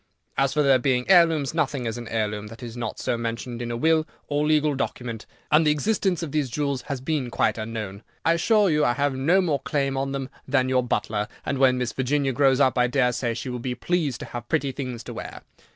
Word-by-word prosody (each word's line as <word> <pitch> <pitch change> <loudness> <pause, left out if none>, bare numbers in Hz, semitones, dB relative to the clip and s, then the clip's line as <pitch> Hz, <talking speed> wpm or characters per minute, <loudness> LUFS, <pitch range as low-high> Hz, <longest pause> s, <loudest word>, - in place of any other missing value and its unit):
As 135 0 +2
for 150 - +2
their 135 -2 +5
being 125 -1 +1
heirlooms, 165 -6 +4
nothing 145 -6 -1
is 115 - -2
an 120 -1 -7
heirloom 105 -2 -2
that 115 +3 -11
is 115 -1 -7
not 120 0 -4
so - - -1
mentioned 115 +1 -4
in 120 - -4
a 120 - -2
will 160 +3 +2 0.2
or 145 +1 0
legal 155 -1 +3
document, 120 -4 -4 0.2
and 155 +2 +6
the 150 - +3
existence 180 +3 +1
of 155 - -4
these 150 -3 0
jewels 140 0 -1
has 140 -2 -3
been 135 -1 -2
quite 115 - +1
unknown. 110 -3 -5 0.2
I 165 - +5
assure 210 +5 +3
you 150 0 +2
I 120 - +3
have 140 +1 0
no 165 +9 +3
more 155 -6 0
claim 135 -1 -1
on 135 0 -1
them 135 -1 -4 0.2
than 130 -2 +2
your 130 -1 +3
butler, 105 -3 -1 0.2
and 140 - -1
when 130 -1 +4
Miss 125 -2 -2
Virginia 135 +1 0
grows 135 0 +3
up, 130 -2 +3
I 125 - +4
dare 125 0 +2
say 120 -1 -2
she 130 - -5
will 125 0 -4
be 125 +1 -3
pleased 150 -3 -1
to - - -5
have 120 -1 -7
pretty 135 0 +1
things 125 -3 -5
to - - -7
wear. - - -8
135 Hz, 235 wpm, -25 LUFS, 120-150 Hz, 0.2 s, and